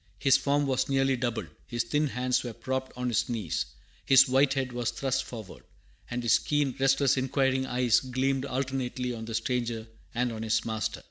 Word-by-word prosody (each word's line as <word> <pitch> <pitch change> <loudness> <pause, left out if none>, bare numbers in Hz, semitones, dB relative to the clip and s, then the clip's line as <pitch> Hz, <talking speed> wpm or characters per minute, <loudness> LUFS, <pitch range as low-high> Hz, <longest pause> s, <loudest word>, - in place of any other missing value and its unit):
His 135 +3 +4
form 140 +2 +2
was 130 -1 0
nearly 135 -1 +2
double, 120 -5 -2 0.2
his 120 -1 -1
thin 150 +5 0
hands 125 -1 0
were 120 -2 -5
propped 130 +3 -3
on 125 0 -2
his 120 - 0
knees, 105 - -2 0.4
his 135 +1 +7
white 135 +2 +3
head 130 -2 -1
was 120 -1 -1
thrust 130 -1 -1
forward, 110 -6 -9 0.5
and 120 0 -3
his 115 -2 +4
keen, 145 -3 0
restless, 135 0 +3
inquiring 130 0 +1
eyes 125 -2 +3
gleamed 130 +1 -1
alternately 130 -1 -2
on 110 -1 -6
the 115 0 -5
stranger 120 -2 -1 0.3
and 120 0 +1
on 110 -1 -6
his 110 -1 0
master. 110 -1 -2
130 Hz, 185 wpm, -28 LUFS, 120-135 Hz, 0.5 s, his